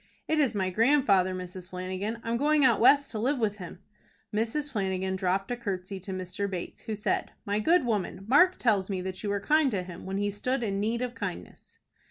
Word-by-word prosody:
"It 315 0 +1
is 260 -7 +2
my 190 -2 0
grandfather, 215 -5 +3
Mrs. 180 0 -7
Flanagan. 185 +4 -4
I'm 230 0 -1
going 295 +2 +3
out 235 -3 +4
West 280 +4 +5
to 220 - -4
live 265 +6 +1
with 215 -3 0
him." 180 0 -10 0.5
Mrs. 235 +8 -1
Flanagan 190 -4 -1
dropped 190 +2 -1
a - - 0
courtesy 195 -4 -4
to 190 +1 -7
Mr. 185 +2 -3
Bates, 180 -2 -6
who 220 - -3
said, 210 - -1
"My 205 +1 0
good 325 +6 +3
woman, 205 -4 -2
Mark 360 +9 +5
tells 205 -5 +1
me 190 -2 -2
that 185 0 -5
you 210 - -3
were 200 0 0
kind 300 +7 +3
to 195 -6 -2
him 180 0 -9
when 195 +1 -2
he 205 0 0
stood 245 +5 -2
in 200 -3 -1
need 230 +4 0
of 245 -1 -3
kindness." - - -7
205 Hz, 215 wpm, -28 LUFS, 190-245 Hz, 0.5 s, West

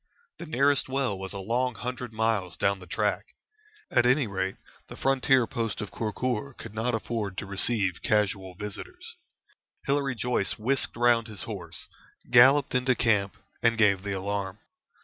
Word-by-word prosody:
The 170 - -7
nearest 140 -1 +2
well 130 -6 0
was 95 0 -6
a 100 - -5
long 120 +5 -1
hundred 125 0 -5
miles 110 -6 -1
down 100 +2 +1
the 90 - -12
track. - - 0 0.7
At 120 - +4
any 130 +2 +3
rate 95 -2 -2 0.3
the - - -9
frontier 135 -2 +3
post 115 -2 -3
of 105 -2 -5
Kurkur 120 +3 -3
could 115 - -9
not 115 +2 0
afford 105 -2 -3
to - - -3
receive 100 -1 +1
casual 95 -3 0
visitors. 105 +1 -8 0.7
Hilary 140 -2 0
Joyce 120 -4 0
whisked 125 +2 0
round 120 -1 +3
his 105 -3 -6
horse, 85 -7 -7 0.4
galloped 130 +3 +6
into 125 0 +2
camp, 105 -4 +1 0.2
and 115 -1 +3
gave 100 -4 +4
the 100 0 -3
alarm. 95 0 -3
110 Hz, 155 wpm, -27 LUFS, 100-125 Hz, 0.7 s, galloped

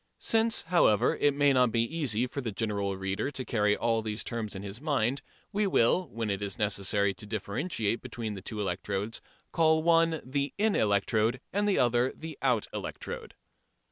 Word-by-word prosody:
Since, 225 0 +1
however, 165 - +3
it 145 -1 +2
may 145 -1 +4
not 125 -2 +4
be 115 0 +2
easy 125 -4 0
for 140 +2 -5
the 115 -4 -3
general 100 -2 -2
reader 95 +7 -2
to 130 -3 -5
carry 105 -2 +2
all 115 -1 +1
these 110 0 -3
terms 115 -4 -4
in 95 - -6
his 100 +4 -7
mind, 140 -3 0 0.3
we 205 0 +1
will, 180 +3 +3
when 115 -2 -3
it 100 0 -2
is 100 -2 -3
necessary 100 -1 +1
to 105 +3 -8
differentiate 110 - -2
between 115 -4 -5
the 95 - -7
two 105 +3 -5
electrodes, 100 +2 -3 0.3
call 160 -1 +3
one 165 -1 +4
the 140 +2 -2
in 215 +1 +2
electrode 110 +3 +2
and 205 +1 +1
the 195 - +2
other 120 +1 +3
the 160 0 -7
out 125 -5 +2
electrode. - - -6
115 Hz, 180 wpm, -29 LUFS, 105-145 Hz, 0.3 s, may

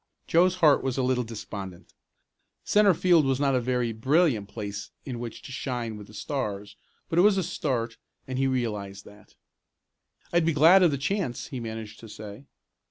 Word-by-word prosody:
Joe's 180 +2 +3
heart 155 -5 +4
was 135 -1 -2
a 130 - +1
little 125 -1 +1
despondent. 105 -5 -8 0.7
Centre 205 -3 +4
field 175 -3 +4
was 135 -1 0
not 140 -1 +2
a 130 - +2
very 125 -1 0
brilliant 130 - +2
place 100 -2 -6 0.2
in 125 -4 -5
which 120 -1 -7
to - - -9
shine 120 -4 -4
with 105 -1 -10
the 110 - -15
Stars, 105 -5 -4 0.3
but 165 - +1
it - - +8
was 200 0 +5
a 190 - +1
start 120 -8 -2 0.3
and 130 0 -3
he 135 - +2
realized 105 -6 -3
that. 105 +1 -17 1.0
"I'd 175 -1 +4
be 165 0 +2
glad 165 +6 +7
of 175 - +6
the 140 - -1
chance," 140 - -2
he 130 - -5
managed 110 -2 -7
to 115 - -12
say. 105 +5 -10
125 Hz, 185 wpm, -26 LUFS, 110-150 Hz, 1.0 s, it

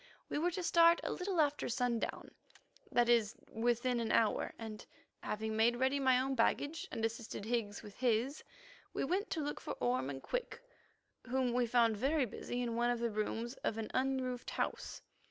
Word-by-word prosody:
We - - -1
were 345 +3 +2
to 355 +1 -4
start 335 0 +6
a - - -2
little 360 -1 -2
after 295 -1 +2
sundown, 245 -1 -1 0.6
that 240 -1 +4
is, 230 -3 +3 0.2
within 240 +2 +1
an 230 -1 -1
hour, 225 -2 +2
and, 220 -2 -7 0.4
having 220 +1 -3
made 230 +2 +4
ready 260 +3 +1
my 260 -2 +4
own 270 +1 0
baggage 285 +6 +1
and 225 - -1
assisted 225 -2 -4
Higgs 220 -3 -2
with 205 - -11
his, 250 +3 +1 0.5
we - - 0
went 380 +9 0
to 320 - -1
look 290 - -3
for - - -4
Orme 125 +2 0
and 135 -1 -6
Quick, - - -3 0.6
whom 255 -1 0
we 245 -1 +2
found 230 -2 +3
very 275 +4 +2
busy 245 +2 -4
in 235 -1 -2
one 240 +1 +2
of 245 - +1
the 235 -1 0
rooms 225 +3 -2
of 225 - 0
an 220 -1 -4
unroofed 255 -1 -1
house. - - -3
240 Hz, 185 wpm, -35 LUFS, 225-270 Hz, 0.6 s, start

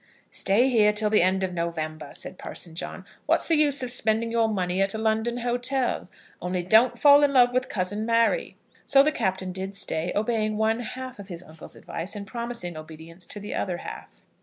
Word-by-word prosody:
"Stay 215 +7 +3
here 220 -5 +4
till 210 0 0
the 215 - +5
end 190 +2 +2
of 185 -1 -2
November," 160 -3 -4
said - - -6
Parson 170 - -8
John. 165 - -7 0.2
"What's - - +2
the 330 - +3
use 285 -3 +3
of 250 - 0
spending 225 -1 +1
your 230 -1 +2
money 185 -3 -1
at 195 +2 +1
a - - -2
London 220 +2 0
hotel? 245 -2 -1 0.3
Only 180 0 -2
don't 220 +7 +4
fall 285 0 +7
in 285 -1 +3
love 245 -2 +5
with 255 +1 0
cousin 205 +2 -1
Mary." 230 - +1 0.3
So 275 0 +6
the 305 - +2
Captain 190 -7 -2
did 190 +2 -5
stay, 175 -2 -1
obeying 215 0 0
one 220 +1 +1
half 250 0 -7
of 200 - -9
his 175 -2 -7
uncle's 160 -1 -12
advice, 170 +5 -5
and 205 -1 -6
promising 235 -5 -5
obedience 160 +3 -10
to 210 - -6
the 205 - -6
other 180 -3 -2
half. - - -10
215 Hz, 200 wpm, -25 LUFS, 180-240 Hz, 0.3 s, fall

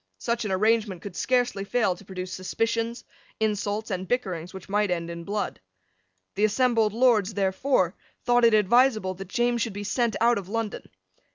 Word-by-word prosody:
Such 235 - -2
an 205 - -2
arrangement 210 -2 +1
could 200 -3 -7
scarcely 245 -5 0
fail 205 -3 +1
to 180 - -15
produce 185 -1 -6
suspicions, 230 +5 -2 0.4
insults, 210 0 -1
and 185 0 -3
bickerings 185 -7 -2
which 190 -2 -10
might 205 0 +1
end 170 -1 -2
in 170 0 -7
blood. 205 0 -3 0.7
The 205 - -1
assembled 225 -1 +2
Lords, 220 -4 +3
therefore, 190 -1 +1 0.3
thought 245 0 +3
it 230 -2 +6
advisable 215 -1 +3
that 190 +1 -9
James 240 +2 0
should 225 -3 -1
be 205 +1 -5
sent 230 +2 0
out 235 -1 +3
of 190 -1 -10
London. 225 -1 -4
210 Hz, 170 wpm, -26 LUFS, 190-235 Hz, 0.7 s, it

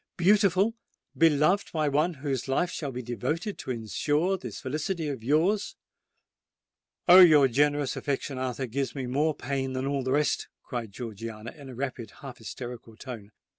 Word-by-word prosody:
Beautiful—beloved 190 -3 +2
by 155 -2 +1
one 155 +5 +1
whose 135 -3 -3
life 155 +7 +1
shall 145 -4 -4
be 125 0 -5
devoted 155 - -3
to - - -7
ensure 145 - 0
the 130 -10 -6
felicity 155 - -3
of 130 -6 -5
yours——" 170 - +1 1.3
"Oh! 180 +1 +10
your 155 -6 +8
generous 145 +1 +1
affection, 140 -1 -3
Arthur, 130 +1 -2
gives 135 +4 -3
me 135 -2 -3
more 145 +5 +1
pain 135 -2 -3
than 130 +1 -2
all 140 0 0
the 130 0 -2
rest!" 150 +1 +1 0.2
cried 120 -5 -5
Georgiana, 115 0 -7
in 140 -3 -12
a 125 - -9
rapid—half 125 0 -6
hysterical 120 0 -8
tone. 115 -6 -8
140 Hz, 150 wpm, -28 LUFS, 125-155 Hz, 1.3 s, Oh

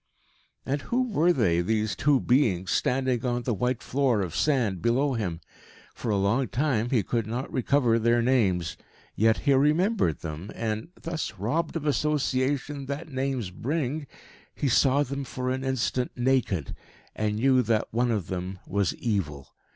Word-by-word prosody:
And 140 +2 -1
who 250 +2 0
were 175 -2 +4
they 90 - +2
these 110 +3 0
two 145 -2 +3
beings, 115 -10 +2
standing 130 -2 +1
on 120 -1 -1
the 120 - 0
white 125 +3 -1
floor 130 -5 +1
of 90 -5 -4
sand 120 - +1
below 130 +4 +2
him? 90 -8 -3 0.5
For 115 - -5
a 105 - +2
long 105 +7 +1
time 125 -4 0
he 120 -6 +2
could 115 +3 -1
not 120 +4 -4
recover 125 -3 +2
their 120 +1 +3
names. 105 -9 +1 0.4
Yet 110 +1 +3
he 140 - +3
remembered 150 - +2
them; 80 +4 -6
and, 110 +1 -3
thus 165 -6 -4
robbed 155 - -1
of 160 -2 -3
association 140 -1 0
that 145 +4 -5
names 130 -6 -2
bring, 145 - -2 0.5
he 145 - -1
saw 135 +3 +4
them 140 +1 -4
for 130 -1 -3
an 130 +1 -2
instant 130 -1 0
naked, 120 - 0 0.4
and 105 -1 -1
knew 130 +3 +4
that 110 -2 0
one 120 +2 +2
of 105 -6 0
them 95 +1 -4
was 100 -1 0
evil. 75 - -2
125 Hz, 160 wpm, -27 LUFS, 105-140 Hz, 0.5 s, were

